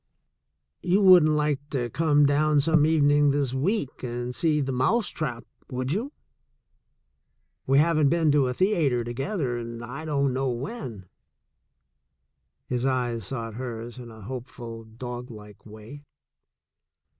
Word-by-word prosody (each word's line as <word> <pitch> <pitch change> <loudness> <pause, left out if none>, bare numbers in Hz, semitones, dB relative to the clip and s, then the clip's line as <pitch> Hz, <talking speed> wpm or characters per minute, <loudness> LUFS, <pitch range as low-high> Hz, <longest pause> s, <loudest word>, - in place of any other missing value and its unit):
"You 180 +3 +2
wouldn't 175 -5 +7
like 150 -2 +1
to 120 -4 -2
come 150 -1 +3
down 150 +1 +3
some 155 +1 +3
evening 145 -2 +4
this 140 -2 0
week 145 - -1
and 120 0 -4
see 155 +2 +1
The 135 -2 -1
Mouse 200 - +1
Trap,' 120 -7 -4 0.2
would 130 +1 -3
you? 230 - -2 1.6
We 135 +1 +4
haven't 155 -1 +4
been 165 -1 +2
to 145 -3 +3
a 125 - -1
theater 155 - +1
together 130 - -3
in 115 0 -7
I 140 +7 -7
don't 140 -3 0
know 135 +1 0
when." 120 - -6 1.6
His 125 -1 -2
eyes 120 -5 -1
sought 115 -4 -4
hers 120 0 -6
in 120 -1 -9
a 110 -1 -13
hopeful, 120 0 -8
doglike 115 -2 -9
way. 110 +7 -11
135 Hz, 135 wpm, -26 LUFS, 120-150 Hz, 1.6 s, wouldn't